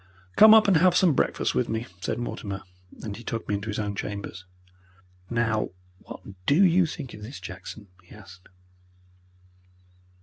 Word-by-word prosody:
"Come 220 +1 +9
up 215 -1 +6
and 190 -4 +5
have 180 +2 +4
some 180 -5 +4
breakfast - - 0
with 65 - 0
me," 110 +1 -2
said - - -3
Mortimer, 100 -5 -5 0.4
and 105 -2 -5
he 120 - -11
took 115 0 -4
me - - -1
into 100 +1 -3
his 105 - -3
own 105 -1 -2
chambers. 100 -3 -6 0.8
"Now, 115 -2 0 0.3
what - - -11 0.3
DO 165 +8 +5
you 180 -1 +4
think 150 -5 -7
of 105 - -11
this, 115 +7 -8
Jackson?" 95 +3 -9
he 90 - -16
asked. 95 -3 -15
110 Hz, 165 wpm, -26 LUFS, 100-155 Hz, 0.8 s, Come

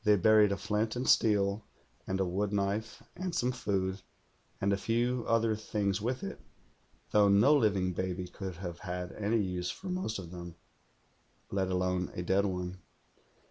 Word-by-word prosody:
They 105 0 +5
buried 105 +1 +5
a 100 - 0
flint 105 +2 -1
and 125 +2 -2
steel 105 -1 +3 0.4
and 95 0 -1
a 95 - +2
woodknife 100 +3 -1
and 185 -1 -3
some 125 +1 +1
food, 100 -6 -1 0.6
and 100 +1 +2
a - - +4
few 120 +4 0
other 115 -1 +2
things 105 -2 -1
with 125 +4 -2
it, 95 - -5 0.7
though 105 -1 +5
no 105 +9 +6
living 100 -8 +2
baby 90 0 -3
could 95 -1 -6
have 85 -1 -6
had 90 -2 -4
any 110 +2 0
use 90 -4 -1
for 190 - -6
most 180 -12 -2
of 90 -4 -8
them, 85 -2 -8 1.0
let 95 -1 0
alone 90 -1 0
a 90 - -3
dead 95 +3 +2
one. 90 0 -4
100 Hz, 165 wpm, -31 LUFS, 95-110 Hz, 1.0 s, no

